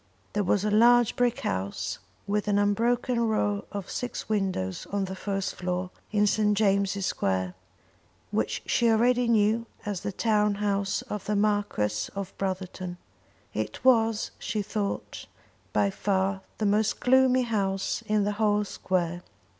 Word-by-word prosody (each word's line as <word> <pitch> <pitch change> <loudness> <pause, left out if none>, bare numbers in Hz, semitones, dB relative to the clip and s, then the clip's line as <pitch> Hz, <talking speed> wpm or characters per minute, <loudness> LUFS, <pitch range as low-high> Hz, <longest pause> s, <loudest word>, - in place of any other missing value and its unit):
There 210 - +1
was 200 +2 +1
a 210 - +1
large 240 +2 +5
brick 245 -1 +1
house, 95 +1 -3 0.3
with 205 +1 -1
an 205 -1 +2
unbroken 235 +4 +1
row 210 -3 0
of 200 -2 -5
six 245 -1 -4
windows 190 - -1
on 200 -1 0
the 190 0 -6
first 195 0 -2
floor, 180 0 -3 0.2
in 210 -1 +3
St. 210 0 +2
James' 200 -2 +2
Square, 95 - -1 0.8
which - - -1
she 235 - +2
already 240 +2 +3
knew 225 +1 +2 0.2
as 205 -4 -3
the - - -3
town 210 0 +2
house 200 -1 0
of 210 -2 -6
the 210 - 0
Marquis 200 - 0
of 195 -1 -5
Brotherton. 185 -2 -4 0.6
It 110 - -4
was, 225 -3 +3
she 210 -2 -2
thought, 205 0 -4 0.4
by 200 - +2
far 195 0 0 0.2
the 215 - -1
most 210 +1 +2
gloomy 260 0 +4
house 195 -4 -1
in 210 -1 +2
the 205 - 0
whole 210 -1 +3
square. 175 -3 -2
205 Hz, 145 wpm, -27 LUFS, 190-220 Hz, 0.8 s, large